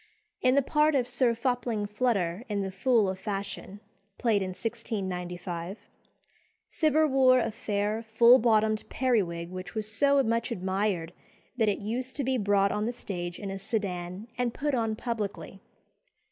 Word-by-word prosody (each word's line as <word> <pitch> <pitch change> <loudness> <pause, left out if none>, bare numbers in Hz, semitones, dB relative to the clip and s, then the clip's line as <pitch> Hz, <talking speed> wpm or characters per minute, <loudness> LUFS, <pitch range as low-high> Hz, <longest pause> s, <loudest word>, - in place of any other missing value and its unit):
In 255 +1 +4
the 280 - +4
part 300 +2 +3
of 250 -3 +2
Sir 245 -1 +2
Fopling 235 -3 -1
Flutter 205 -3 0
in 205 -1 -1
"The 190 - -4
Fool 220 +2 +2
of 190 0 -3
Fashion," 200 -1 -5 0.4
played 225 -5 +2
in 190 - -1
1695, 185 -3 -4 0.9
Cibber 310 -1 +2
wore 260 -2 +5
a 225 -2 0
fair, 210 +1 -2
full 235 +3 +6
bottomed 220 -1 +2
periwig 180 -10 0
which 185 -1 -7
was 215 -1 -2
so 280 +5 +3
much 230 +1 0
admired 190 -3 -1 0.4
that 220 -3 +3
it 200 - 0
used 245 +5 -4
to 280 - -1
be 260 0 0
brought 200 -1 +3
on 210 +1 -1
the - - 0
stage 175 -7 -5
in 200 -1 -5
a 195 - -5
sedan 190 -1 -3
and 245 -2 0
put 290 0 -1
on 225 -3 0
publicly. 215 -4 -4
215 Hz, 160 wpm, -28 LUFS, 195-245 Hz, 0.9 s, full